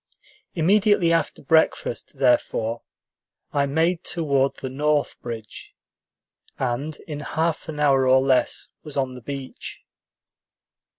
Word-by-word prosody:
Immediately 190 0 +4
after 165 -3 -1
breakfast, 155 -3 +1
therefore, 120 -3 +1 0.7
I 140 -1 +2
made 165 +4 +1
toward 140 -5 +1
the - - -6
north 145 +2 0
bridge, 115 -3 -8 0.8
and 135 +5 -2
in 150 -2 -5
half 160 +2 -2
an 150 -1 -5
hour 135 -3 +4
or 130 +1 +6
less 130 -1 +1
was 150 -2 -8
on 130 -2 0
the 125 - -10
beach. 135 +1 -7
140 Hz, 115 wpm, -24 LUFS, 130-160 Hz, 0.8 s, or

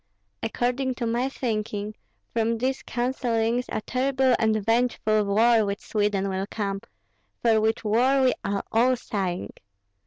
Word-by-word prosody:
According 250 +3 -1
to 240 - -3
my 240 +3 0
thinking, 215 -5 -3 0.4
from 230 0 +1
these 260 +3 -1
counsellings 240 -1 -1
a - - -2
terrible 260 +2 +1
and 220 -1 +2
vengeful 225 -2 +2
war 220 +3 +4
with 200 0 -2
Sweden 205 -2 0
will 190 0 -2
come, 200 -2 -3 0.6
for 225 -2 +4
which 220 +1 0
war 250 +5 +3
we 255 - +4
are 200 0 -1
all 245 +3 +4
sighing. 190 -7 -3
225 Hz, 135 wpm, -25 LUFS, 210-250 Hz, 0.6 s, war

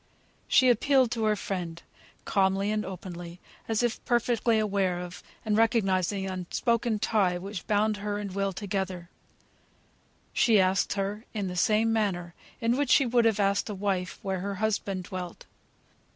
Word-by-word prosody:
She 260 -1 +5
appealed 255 +1 +3
to 225 -2 -1
her 215 0 +3
friend 180 -4 -4 0.5
calmly 195 +1 +1
and 215 0 0
openly, 175 -2 -8 0.3
as 225 +1 0
if 240 -1 -1
perfectly 235 -1 +2
aware 195 -4 0
of, 180 0 -7 0.2
and 215 -1 +1
recognising 200 -4 +2
the 190 - -3
unspoken 230 +5 0
tie 205 -4 +1
which 195 0 -7
bound 210 0 +2
her 205 0 -3
and 205 -2 -5
Will 195 0 0
together; 190 -3 -4 1.2
she 230 -6 +4
asked 185 0 +2
her 205 +3 -3
in 200 -3 -2
the 180 - -5
same 220 +3 +2
manner 180 -6 -1 0.3
in 230 +2 +1
which 285 -2 0
she 275 - +5
would 240 -1 +3
have 220 -2 +2
asked 200 +1 +1
a 210 - -4
wife 190 -2 -2
where 190 -1 -2
her 200 +2 -3
husband 200 -2 -1
dwelt. 180 -1 -7
200 Hz, 160 wpm, -28 LUFS, 185-220 Hz, 1.2 s, She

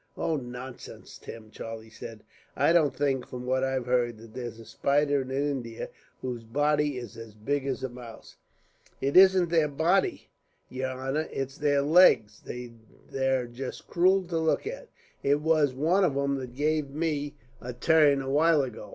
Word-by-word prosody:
"Oh, 165 - 0
nonsense, 125 -1 -8
Tim!" 110 -1 -11
Charlie 115 0 -8
said; 115 -1 -10 0.3
"I 165 - +3
don't 150 -6 +3
think, 135 -2 0
from 125 0 -7
what 130 +1 +1
I've 130 -2 -1
heard, 120 -2 +1
that 110 0 -14
there's 120 -3 -6
a 115 - -11
spider 145 +2 +1
in 130 - -7
India 135 -4 -3 0.3
whose 125 -3 -4
body 145 +3 +1
is 120 -4 -8
as 115 -2 -10
big 140 +6 -2
as 135 -1 -3
a - - 0
mouse." 120 -2 -12 0.6
"It 140 +1 -1
isn't 185 -2 +7
their 165 -2 +3
body, 165 +7 0 0.4
yer 130 0 -3
honor. 135 +4 -2
It's 135 +1 -4
their 145 -1 +2
legs. 145 - +5
They're 125 +2 -4
just 125 +2 -7
cruel 185 +2 +3
to 165 -2 0
look 160 - +1
at. - - -6 0.3
It 145 +1 +2
was 150 -4 +2
one 170 +8 +2
of 145 -7 +1
'em 140 0 0
that 125 -2 -8
gave 150 0 0
me 145 -1 -2 0.3
a 125 - -5
turn, 145 +2 +3
a 135 - -4
while 155 0 +4
ago. 120 -5 -7
135 Hz, 170 wpm, -28 LUFS, 125-150 Hz, 0.6 s, isn't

